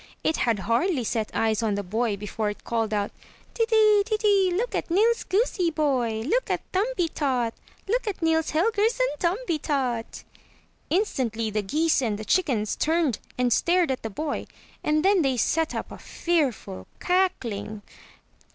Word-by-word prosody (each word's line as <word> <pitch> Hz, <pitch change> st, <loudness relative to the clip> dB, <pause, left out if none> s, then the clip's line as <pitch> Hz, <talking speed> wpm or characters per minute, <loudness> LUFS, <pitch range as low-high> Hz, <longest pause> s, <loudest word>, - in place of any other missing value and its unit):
It 315 Hz, -, +1 dB
had 230 Hz, -3 st, +1 dB
hardly 240 Hz, -, 0 dB
set 220 Hz, -1 st, -1 dB
eyes 220 Hz, 0 st, +1 dB
on 215 Hz, -3 st, 0 dB
the 205 Hz, -, -2 dB
boy 215 Hz, +2 st, -1 dB
before 210 Hz, +1 st, -3 dB
it 205 Hz, -, -8 dB
called 225 Hz, -2 st, -1 dB
out: 205 Hz, -1 st, -1 dB, 0.4 s
Teetee! 440 Hz, -3 st, +4 dB
Teetee! 415 Hz, -3 st, +2 dB
Look 440 Hz, +8 st, -1 dB
at -, -, -2 dB
Nils 440 Hz, +7 st, +3 dB
goosey 385 Hz, -4 st, +1 dB
boy! 260 Hz, -8 st, 0 dB
Look 465 Hz, -, 0 dB
at -, -, -1 dB
Thumbie 380 Hz, -4 st, 0 dB
tot! 250 Hz, -6 st, 0 dB, 0.3 s
Look 470 Hz, +3 st, 0 dB
at 405 Hz, -, -2 dB
Nils 320 Hz, -1 st, +1 dB
Helgersson 440 Hz, +8 st, +2 dB
Thumbietot!" 300 Hz, -, -1 dB, 0.7 s
Instantly 240 Hz, -, 0 dB
the 210 Hz, 0 st, 0 dB
geese 300 Hz, +9 st, +1 dB
and 220 Hz, -5 st, -1 dB
the 215 Hz, -, -7 dB
chickens 245 Hz, -, +1 dB
turned 315 Hz, -6 st, +1 dB, 0.2 s
and 250 Hz, -2 st, +2 dB
stared 345 Hz, -, +2 dB
at 260 Hz, -, -3 dB
the 225 Hz, -, -4 dB
boy; 295 Hz, +8 st, -4 dB, 0.4 s
and 305 Hz, +2 st, +1 dB
then 390 Hz, -2 st, +5 dB
they 270 Hz, -4 st, +1 dB
set 320 Hz, +6 st, +1 dB
up -, -, -4 dB
a -, -, -9 dB
fearful 270 Hz, -, -2 dB
cackling. 235 Hz, -, -1 dB
300 Hz, 155 wpm, -25 LUFS, 225-375 Hz, 0.7 s, then